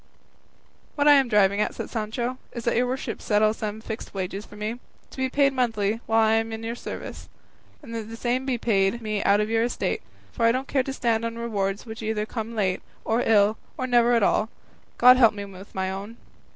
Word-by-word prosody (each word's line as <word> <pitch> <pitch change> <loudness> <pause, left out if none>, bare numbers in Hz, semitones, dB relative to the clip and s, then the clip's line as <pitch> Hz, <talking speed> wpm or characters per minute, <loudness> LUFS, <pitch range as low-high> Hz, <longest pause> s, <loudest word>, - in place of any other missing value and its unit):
"What 290 0 +2
I 295 - +9
am 275 -2 +5
driving 205 -2 +3
at," - - -1
said - - -6
Sancho, 235 +3 -3
"is 235 - -6
that 235 - +1
your 245 +2 +2
worship 260 +2 -4
settle 215 0 +3
some 215 0 -5
fixed 220 -2 -7
wages 195 +2 -4
for - - -14
me, 215 +3 -4 0.3
to - - -13
be 260 0 0
paid 275 +1 +3
monthly 225 -4 0
while 225 0 +4
I - - +3
am 225 0 +1
in 220 0 -6
your 230 +1 -3
service, 240 - -8 0.5
and 230 -5 -9
that 225 -1 -5
the 225 - -7
same 245 +2 0
be 260 -2 -1
paid 215 0 +1
me 215 -1 -1
out 200 +1 +4
of 210 - 0
your 225 0 +2
estate; 240 - -1 0.3
for 235 - -3
I 230 - +6
don't 260 +3 -2
care 270 - +2
to 270 - -4
stand 230 -4 0
on 230 0 -3
rewards 205 -3 -2
which 225 -1 -8
either 215 -1 -1
come 225 0 -5
late, 190 -4 0 0.2
or 225 +2 +1
ill, 215 0 +3 0.2
or 255 - -2
never 240 -1 +4
at 230 -3 +3
all; 215 +2 +2 0.5
God 250 +1 +8
help 230 -4 +5
me 200 -1 -5
with 195 0 -13
my 190 0 -1
own. 200 +4 -7
225 Hz, 225 wpm, -25 LUFS, 210-240 Hz, 0.5 s, I